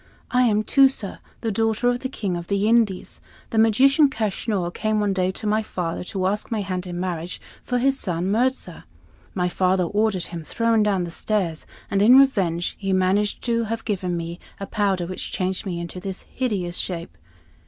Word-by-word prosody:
I 250 0 +4
am 215 -2 +2
Tusa, 265 -6 +2 0.2
the 225 - -1
daughter 225 +2 +1
of 245 0 +2
the 260 - -4
King 200 -8 -3
of 170 0 -5
the 200 +1 +1
Indies. 220 -5 +1 0.3
The 225 - +2
magician, 270 +7 +5
Kaschnur, 205 -5 -2
came 215 -1 0
one 205 -1 +1
day 185 -1 +1
to 215 - -7
my 215 +1 +2
father, 175 -6 -4
to 185 -1 -2
ask 205 +3 -1
my 220 -2 -1
hand 185 -2 -3
in 175 0 -5
marriage 175 -1 -3 0.2
for 250 - -1
his 270 +2 +2
son 180 0 -1
Mirza. 235 -6 -1 0.5
My 180 -2 +1
father 185 +1 +2
ordered 205 0 +1
him 170 -2 -6
thrown 230 +5 +1
down 195 -4 +1
stairs, 175 -4 -2 0.2
and 195 - +2
in 240 +5 +8
revenge 190 -11 +3
he 195 -2 -1
managed 190 +3 +1
to 230 -1 +1
have 230 +1 -3
me - - -28
given 175 -5 -2 0.2
a 195 - -4
powder 195 -4 0
which 185 +1 -5
changed 185 +1 -1
me 175 -2 -3
into 170 +1 -6
this 190 0 -5
hideous 195 -9 -2
shape. 170 -2 -4
200 Hz, 185 wpm, -23 LUFS, 180-225 Hz, 0.5 s, in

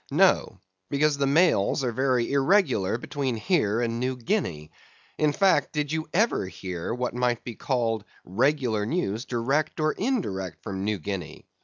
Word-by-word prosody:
No: - - +3 0.3
because 145 0 +1
the 140 - +2
mails 140 - +3
are 125 - 0
very 125 0 +1
irregular 135 - +2
between 130 0 -3
here 115 - +1
and 115 -1 -1
New 130 +1 -1
Guinea. 115 - -2 0.5
In 150 -1 +3
fact, 195 +5 +2
did 150 -1 -1
you 160 -1 -2
ever 205 - +1
hear 90 -2 -5
what 125 +1 -2
might 125 -1 0
be 120 - -6
called 115 -4 -1 0.2
regular 120 - +1
news 115 - -1
direct 135 +7 -1
or 155 0 +2
indirect 180 - -2
from 95 0 -4
New 105 0 0
Guinea? 95 -2 -6
125 Hz, 155 wpm, -26 LUFS, 110-150 Hz, 0.5 s, No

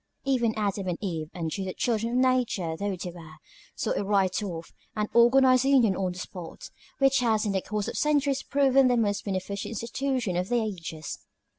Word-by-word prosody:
Even 240 -5 +1
Adam 200 -2 -1
and 175 -2 -1
Eve, 165 -7 -4
untutored 180 +3 -4
children 230 0 0
of - - +1
nature 250 -10 +1
though 200 +2 -2
they 180 0 -5
were, 160 -2 -12 0.4
saw - - -2
it - - 0
right 195 -1 +1
off, 170 -5 -6 0.2
and 210 -1 -1
organized 255 +2 +5
a - - +3
union 240 -8 +4
on 185 -1 -1
the - - -11
spot, 180 -2 -8 0.3
which 275 -1 +4
has 220 -3 +1
in 205 - 0
the 190 -1 0
course 210 0 -3
of - - -4
centuries 285 -2 +1
proven 275 -1 +3
the 245 -1 +3
most 205 -3 0
beneficent 200 +2 -4
institution 235 -2 -2
of 180 +1 -1
the 245 - +2
ages. 165 -8 -5
210 Hz, 190 wpm, -27 LUFS, 185-250 Hz, 0.4 s, organized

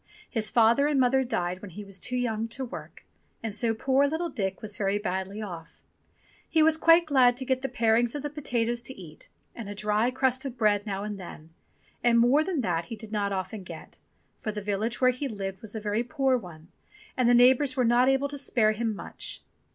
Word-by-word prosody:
His 220 -3 -1
father 235 +5 +4
and 295 -2 +1
mother 265 +1 +3
died 180 -7 -2
when 205 - -8
he 205 +4 -8
was 195 -1 -8
too 250 +7 -3
young 225 -2 -1
to 260 +3 -4
work, 245 - -10 0.4
and 225 -2 -3
so 225 +1 0
poor 265 +4 +2
little 325 +4 -2
Dick 195 -9 -3
was 210 -1 -6
very 195 +1 0
badly 195 +1 -3
off. 170 -5 -9 0.7
He 320 -1 +4
was 320 0 +4
quite 330 +1 +5
glad 255 -5 +4
to 260 - -3
get 260 0 0
the 270 - -2
parings 235 -1 +2
of 290 - -4
the 295 - -3
potatoes 240 -5 -1
to 250 -1 -6
eat 160 -4 -11 0.2
and 225 -4 -8
a 205 - -6
dry 210 +3 +1
crust 260 0 0
of 265 -3 -6
bread 210 -2 +2
now 195 -1 -3
and 210 -1 -5
then, 165 -3 -10 0.5
and 235 -1 +4
more 250 +6 +4
than 340 -5 -1
that 170 -6 -1
he 225 - -7
did 220 -1 -10
not 205 -2 -1
often 195 +2 -4
get, 185 - -11 0.4
for 215 - -2
the 210 - -5
village 210 +4 -2
where 255 0 +5
he 255 +3 -4
lived 195 -5 -5
was 220 0 -6
a - - -2
very 210 +2 -1
poor 270 0 +1
one 170 -7 -8 0.5
and 250 -2 +2
the 245 - +6
neighbours 255 +2 +5
were 250 - +3
not 240 +2 +4
able 270 +1 +2
to 285 0 -6
spare 225 -5 +2
him 220 0 -2
much. - - -7
230 Hz, 220 wpm, -27 LUFS, 205-260 Hz, 0.7 s, the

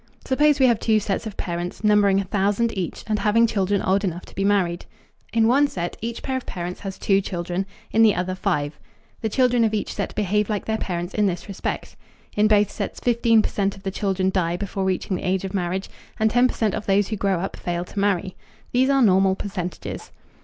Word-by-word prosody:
Suppose 295 +2 +3
we 265 - +6
have 235 -4 +3
two 220 -2 +3
sets 205 +2 -2
of 210 - -8
parents, 175 +3 -4
numbering 205 -2 +4
a - - 0
thousand 205 +4 0
each 185 -4 -4
and 215 -1 0
having 225 +2 +4
children 200 -3 0
old 195 +2 +2
enough 180 -2 -3
to - - -16
be 195 - -2
married. 190 -4 +1 0.4
In 225 -1 +3
one 280 +5 +4
set 175 -9 -4
each 230 +1 -4
pair 265 - -2
of 260 - -7
parents 180 0 -5
has 195 -1 -6
two 195 -1 +2
children; 180 0 -3 0.2
in 225 - +3
the 215 -3 +6
other 180 +1 -1
five. 155 -6 -2 0.4
The 220 - -1
children 245 +1 +3
of 220 -1 +1
each 210 - -2
set - - -4
behave 210 +1 +1
like 210 -2 -2
their 220 0 -1
parents 175 0 -3
in 210 -1 +2
this 175 0 -3
respect. 200 -2 -4 0.4
In 210 +1 +4
both 210 -1 +3
sets - - -4
15 230 -2 +3
percent 200 -1 -1
of 195 - -16
the 195 - -2
children 190 -1 0
die 175 -2 0
before 195 0 -3
reaching 185 0 -1
the - - -7
age 190 0 0
of 190 - -5
marriage, 190 0 -2 0.3
and 220 0 +3
10 245 +2 +5
percent 220 -4 -1
of 215 - -4
those 195 0 +2
who 220 - -1
grow 195 -3 0
up 190 - -4
fail 175 0 -3
to 200 - -6
marry. 195 -2 0 0.4
These 260 +2 +3
are 275 -2 +4
normal 190 -2 +4
percentages. 190 -3 -5
200 Hz, 220 wpm, -23 LUFS, 185-220 Hz, 0.4 s, we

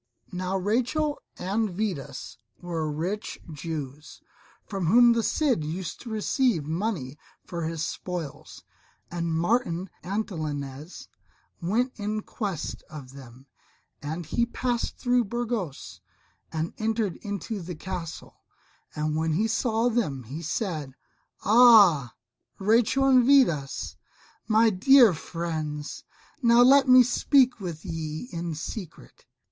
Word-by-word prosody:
Now 185 +1 -2
Rachel 255 +10 0 0.2
and 205 +4 -1
Vidas 175 - -4 0.2
were 165 -3 -3
rich 180 +8 -3 0.2
Jews, 150 -1 -6 0.5
from 195 -5 -3
whom 240 +5 +7
the 230 - +1
Cid 255 - +1
used 165 +2 -5
to 235 - -8
receive 220 - +1
money 160 - -3 0.3
for 170 -2 -4
his 160 -1 -3
spoils. 175 -6 -6 0.5
And 170 -1 -2
Martin 175 0 0
Antolinez 155 -6 -5 0.5
went 225 +9 0
in 210 +1 -2
quest 195 -9 -4
of 135 -4 -10
them, 130 -1 -13 0.6
and 160 +4 -5
he 195 +9 0
passed 240 0 -2
through 245 -1 +2
Burgos 225 - -4 0.5
and 160 +1 -3
entered 220 -4 -1
into 205 0 -5
the 175 0 -6
Castle; 170 -1 -7 0.5
and 150 0 -1
when 160 0 0
he 210 +8 +1
saw 225 +1 +1
them 205 - -1
he 135 +8 -7
said, 155 - -3 0.5
"Ah 205 - +6 0.4
Rachel 230 +6 +3
and 260 -2 +6
Vidas, 235 - +2 0.5
my 220 0 +4
dear 235 +2 +6
friends! 155 -3 -5 0.4
now 235 0 +6
let 275 +2 +6
me 255 0 +8
speak 255 0 +3
with 170 -4 -6
ye 160 +3 -5
in 170 -1 -4
secret." 175 +3 -8
185 Hz, 120 wpm, -26 LUFS, 155-230 Hz, 0.6 s, me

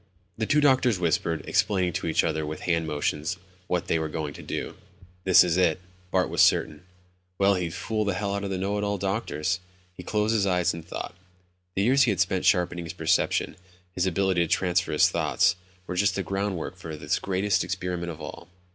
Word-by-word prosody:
The 110 -1 -2
two 150 - +3
doctors 130 -6 +4
whispered, 85 -1 0
explaining 95 -4 +1
to - - -3
each 80 - +2
other 80 -1 -1
with 75 +1 -5
hand 85 -2 0
motions 75 +2 -2 0.3
what 90 -1 -1
they 80 - +1
were 80 -1 -2
going 75 -2 -4
to - - -10
do. - - -5 0.5
This 95 -1 +7
is 90 -1 0
it. 90 -2 +3 0.3
Bart 90 -1 +2
was - - +1
certain. 75 -1 +3 0.6
Well, 100 0 +4
he'd 90 -3 -2
fool 110 +2 -1
the 100 -2 -1
hell 100 +1 -2
out 100 0 -2
of 100 - -3
the 95 - -2
know 100 +2 -1
it - - -2
all 100 0 -1
doctors. 90 -4 -1 0.3
He 90 - -9
closed 105 +4 0
his 100 -3 +2
eyes 90 -2 +2
and 85 - -7
thought. 85 - -6 0.6
The 95 - +1
years 130 +5 +4
he 125 - +5
had 100 -4 0
spent 95 0 +1
sharpening 90 -1 +2
his 80 - -6
perception, - - 0 0.3
his 90 0 0
ability 95 0 +1
to 85 - +1
transfer 90 -1 +1
his 75 - +5
thoughts, - - +2 0.3
were - - -5
just 100 +3 +2
the 95 - -1
groundwork 95 -3 -3
for 80 -4 -7
this 75 +2 -1
greatest 95 0 0
experiment 90 -1 -3
of 80 - -10
all. - - -8
90 Hz, 210 wpm, -26 LUFS, 85-100 Hz, 0.6 s, This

